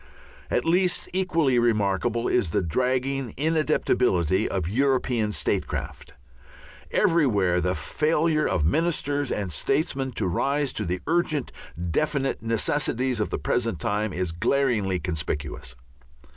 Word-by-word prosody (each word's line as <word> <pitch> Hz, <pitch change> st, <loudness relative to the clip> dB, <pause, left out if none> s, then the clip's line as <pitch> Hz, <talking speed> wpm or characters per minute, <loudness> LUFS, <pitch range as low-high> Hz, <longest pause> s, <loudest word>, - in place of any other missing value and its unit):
At -, -, 0 dB
least 180 Hz, +2 st, +2 dB
equally 165 Hz, -9 st, +2 dB
remarkable 115 Hz, +1 st, +1 dB
is 120 Hz, -9 st, +1 dB
the 80 Hz, -, 0 dB
dragging 130 Hz, -, -1 dB
inadaptability 125 Hz, -, +1 dB
of 95 Hz, -4 st, -2 dB
European 125 Hz, -1 st, +1 dB
statecraft. -, -, -3 dB, 0.8 s
Everywhere 105 Hz, -, +2 dB
the 90 Hz, +2 st, 0 dB
failure 155 Hz, -, +1 dB
of 75 Hz, -, 0 dB
ministers 145 Hz, -, 0 dB
and 100 Hz, -4 st, -2 dB
statesmen 135 Hz, -, -1 dB
to 110 Hz, -, -2 dB
rise 140 Hz, +10 st, 0 dB
to 110 Hz, -, -2 dB
the 90 Hz, +1 st, -2 dB
urgent 160 Hz, -4 st, 0 dB, 0.4 s
definite 140 Hz, -, 0 dB
necessities 125 Hz, +2 st, 0 dB
of 105 Hz, -, 0 dB
the -, -, -2 dB
present 115 Hz, -8 st, -1 dB
time 105 Hz, +5 st, -1 dB
is 90 Hz, -1 st, -2 dB
glaringly 105 Hz, 0 st, +1 dB
conspicuous. 75 Hz, -7 st, -4 dB
120 Hz, 115 wpm, -25 LUFS, 95-145 Hz, 0.8 s, least